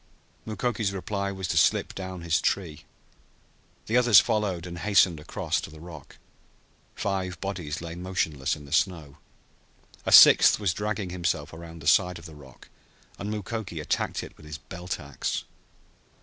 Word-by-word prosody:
Mukoki's 110 -1 -1
reply 100 +1 -3
was 95 -2 -5
to - - 0
slip - - +3
down 95 -2 -6
his 85 -1 +1
tree. 80 -7 -2 1.0
The 115 - +1
others 120 -6 +7
followed, 105 -7 -1
and 85 -1 -7
hastened 95 -4 +3
across 75 - -2
to - - -8
the 80 0 -13
rock. 80 -3 -12 0.8
Five 95 -3 -3
bodies 85 -7 -4
lay 85 -1 -6
motionless 85 -6 -2
in 75 - -12
the 70 - -14
snow. 80 -4 0 0.9
A - - -2
sixth - - +8
was 100 -4 0
dragging 105 -2 -3
himself 80 -4 -2
around 80 -1 -10
the - - -5
side 90 +1 +4
of 85 - -12
the 80 - -10
rock, 70 -3 -15 0.5
and 100 - -4
Mukoki 105 -4 -5
attacked 75 - -2
it - - -11
with 75 - -14
his 75 -1 -6
belt 85 +3 -6
ax. 70 -2 -4
90 Hz, 160 wpm, -26 LUFS, 80-100 Hz, 1.0 s, sixth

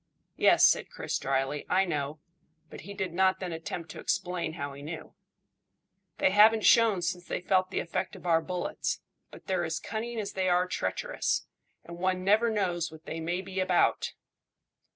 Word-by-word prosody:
"Yes," - - +6
said - - +3
Chris - - -3
dryly, 135 +2 -1
"I 190 +1 +3
know;" 150 -3 -2 0.5
but - - -9
he 200 +3 -9
did 190 -4 -3
not 190 +1 +3
then 185 -2 -4
attempt 165 0 -6
to - - -9
explain 175 -2 -2
how 145 -4 -5
he 140 - -10
knew. 155 +2 -7 1.0
"They 190 - +3
haven't 215 +2 +6
shown 225 -6 +5
since 175 +1 -2
they - - -2
felt 185 +1 +1
the - - -1
effect 170 - -3
of - - -13
our 165 -2 +3
bullets, 180 +1 -3 0.3
but - - -14
they're 185 -2 0
as 160 -1 -2
cunning 230 +2 -4
as 205 - -3
they 190 -1 0
are 180 0 +3
treacherous, - - -1 0.4
and 170 0 -10
one 185 0 0
never 215 +4 +4
knows 180 -6 -1
what 160 0 -14
they 165 - -5
may 175 +3 -2
be 190 0 -5
about." 185 -2 +2
180 Hz, 180 wpm, -29 LUFS, 165-190 Hz, 1.0 s, Yes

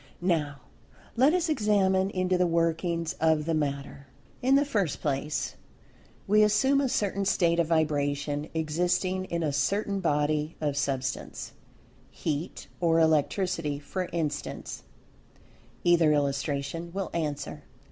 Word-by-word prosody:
Now 150 -7 0 0.5
let 260 +5 +5
us 350 0 +1
examine 200 -8 +2
into 185 -1 0
the 180 0 +3
workings 165 0 0
of 160 -1 +2
the 165 - 0
matter. 140 -2 -3 0.3
In 260 +2 +4
the 285 +1 +4
first 200 - -1
place, 145 +1 -2 0.7
we 210 +2 +4
assume 240 +7 +4
a 270 - 0
certain 200 -3 0
state 170 -3 +2
of 170 - +2
vibration, 145 -2 0
existing 180 +4 0
in 170 -2 -2
a 150 -2 0
certain 200 +8 0
body 150 -2 0
of 145 -2 -1
Substance—Heat, 140 +3 -5
or 165 -2 +3
Electricity 160 0 +1
for 180 +5 -4
instance 160 -4 -3 1.0
(either 170 -3 +5
illustration 145 +3 -1
will 195 -1 -3
answer.) 150 -4 -3
165 Hz, 120 wpm, -28 LUFS, 150-190 Hz, 1.0 s, let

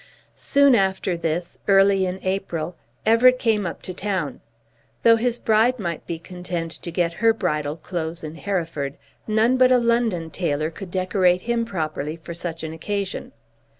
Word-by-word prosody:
Soon 280 -1 +4
after 190 -3 +1
this, 170 +1 -3
early 195 -1 +5
in 185 +1 -4
April, 185 -3 -2 0.3
Everett 245 +3 +6
came 220 -6 +1
up - - -7
to 185 - -5
town. 185 -7 -3 0.6
Though 230 0 +7
his 240 +1 0
bride 225 +3 +3
might 170 -7 -4
be 170 - -3
content 175 -1 -5
to 170 - -7
get 170 0 0
her 225 -1 +5
bridal 150 -8 -1
clothes 165 0 -5
in 155 0 -6
Hereford, 165 -7 -3 0.3
none 225 +4 +3
but 255 0 +5
a 255 - +7
London 230 -9 +1
tailor 155 -3 -1
could 190 +3 -9
decorate 185 0 +2
him 235 -1 0
properly 155 -6 -3
for 165 +1 -9
such 165 -1 -5
an 160 0 -4
occasion. 200 +3 -4
185 Hz, 160 wpm, -23 LUFS, 165-220 Hz, 0.6 s, Though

